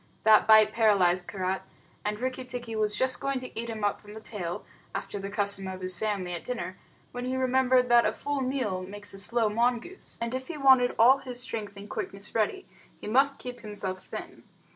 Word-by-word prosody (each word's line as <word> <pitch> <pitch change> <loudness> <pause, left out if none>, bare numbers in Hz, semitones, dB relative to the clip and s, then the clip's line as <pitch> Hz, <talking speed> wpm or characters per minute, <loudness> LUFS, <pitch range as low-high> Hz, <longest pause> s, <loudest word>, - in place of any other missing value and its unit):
That 215 -1 +6
bite 215 -1 +7
paralyzed 185 -6 +3
Karait, 190 -1 -2 0.4
and 210 0 -2
Rikki 255 +1 -2
tikki 245 -3 -6
was 210 -1 +1
just 260 +4 0
going 275 -1 -1
to 255 0 -7
eat 235 0 -4
him 220 -2 -5
up 205 - 0
from 210 0 -12
the 220 - -8
tail, 185 -6 -5 0.3
after 205 - -4
the 195 0 -5
custom 200 -1 -1
of 185 0 -6
his 185 -1 -3
family 200 -5 -1
at 170 - -5
dinner, 235 -7 -5 0.3
when 245 0 -5
he 260 +1 -1
remembered 260 -1 +3
that 240 0 +7
a - - +1
full 285 -1 -3
meal 255 -8 -1
makes 205 +2 -6
a 195 - -3
slow 225 +3 +2
mongoose, 240 - -1
and 235 +1 -3
if 260 0 -4
he 335 - -5
wanted 265 -3 +5
all 255 +5 +7
his 250 -2 -6
strength 215 -4 -4
and 200 +1 -9
quickness 200 0 -6
ready, 225 - 0 0.3
he - - -10
must 275 +5 +3
keep 245 -1 -7
himself 205 -4 -4
thin. - - -8
220 Hz, 205 wpm, -28 LUFS, 200-255 Hz, 0.4 s, bite